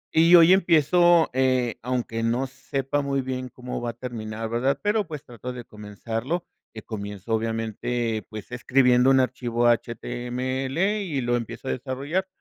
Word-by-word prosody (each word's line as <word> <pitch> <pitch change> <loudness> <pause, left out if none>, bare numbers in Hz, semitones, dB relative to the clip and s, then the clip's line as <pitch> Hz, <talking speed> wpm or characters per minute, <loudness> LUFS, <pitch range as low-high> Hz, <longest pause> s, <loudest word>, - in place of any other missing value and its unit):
Y 165 +2 +7
hoy 170 +1 +8
empiezo, 175 -1 +4
eh, 130 -2 +1
aunque 120 -2 -2
no 120 +3 0
sepa 135 +2 -3
muy 140 -1 -1
bien 130 -1 -4
cómo 125 -1 -6
va 120 - -2
a - - -19
terminar, 115 -2 -5
¿verdad? 120 +4 0
Pero, 210 -1 +1
pues, 150 -3 -7
trato 125 +1 -7
de 120 -2 -8
comenzarlo, 115 - -4 0.3
que 110 - -10
comienzo, 105 0 -5
obviamente, 115 0 -2
pues, 110 +1 -9
escribiendo 125 0 +3
un 135 - +5
archivo 120 -2 0
HTML 130 - -1
y 165 -8 -2
lo 120 0 +1
empiezo 115 +1 -5
a - - 0
desarrollar, 140 +9 -2
125 Hz, 155 wpm, -25 LUFS, 115-140 Hz, 0.3 s, hoy